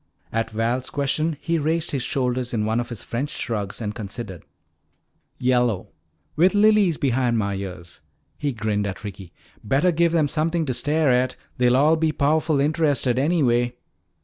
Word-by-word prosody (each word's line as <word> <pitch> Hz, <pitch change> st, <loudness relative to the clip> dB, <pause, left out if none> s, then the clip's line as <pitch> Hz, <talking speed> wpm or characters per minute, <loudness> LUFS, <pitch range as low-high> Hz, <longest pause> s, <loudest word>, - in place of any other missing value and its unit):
At 115 Hz, 0 st, 0 dB
Val's 115 Hz, +4 st, -1 dB
question 150 Hz, +2 st, 0 dB
he 170 Hz, -1 st, 0 dB
raised 160 Hz, +2 st, 0 dB
his 140 Hz, -, -1 dB
shoulders 125 Hz, -1 st, -1 dB
in 105 Hz, -1 st, 0 dB
one 110 Hz, +2 st, +1 dB
of 120 Hz, 0 st, -4 dB
his 120 Hz, -4 st, -6 dB
French 130 Hz, +5 st, -3 dB
shrugs 105 Hz, -7 st, -4 dB
and 105 Hz, -3 st, -3 dB
considered. 105 Hz, -4 st, -6 dB, 0.9 s
"Yellow, 125 Hz, -5 st, +1 dB, 0.5 s
with 180 Hz, +6 st, +4 dB
lilies 205 Hz, -5 st, +4 dB
behind 125 Hz, -3 st, +1 dB
mah 100 Hz, -2 st, 0 dB
ears," 90 Hz, -3 st, -7 dB, 0.4 s
he 145 Hz, -, -1 dB
grinned 105 Hz, -3 st, -1 dB
at 100 Hz, -, -6 dB
Ricky. 95 Hz, -4 st, -8 dB, 0.3 s
"Bettah 140 Hz, -, +2 dB
give 170 Hz, 0 st, +2 dB
them 160 Hz, -3 st, +2 dB
somethin' 160 Hz, +2 st, 0 dB
to 130 Hz, -, -1 dB
stare 150 Hz, +2 st, +1 dB
at; 125 Hz, +1 st, +1 dB, 0.2 s
they'll 125 Hz, 0 st, +4 dB
all 155 Hz, +4 st, +4 dB
be 160 Hz, -1 st, +1 dB
powerful 155 Hz, +1 st, +1 dB
interested, 145 Hz, -4 st, +1 dB
anyway." 125 Hz, -6 st, +2 dB
130 Hz, 160 wpm, -23 LUFS, 115-155 Hz, 0.9 s, with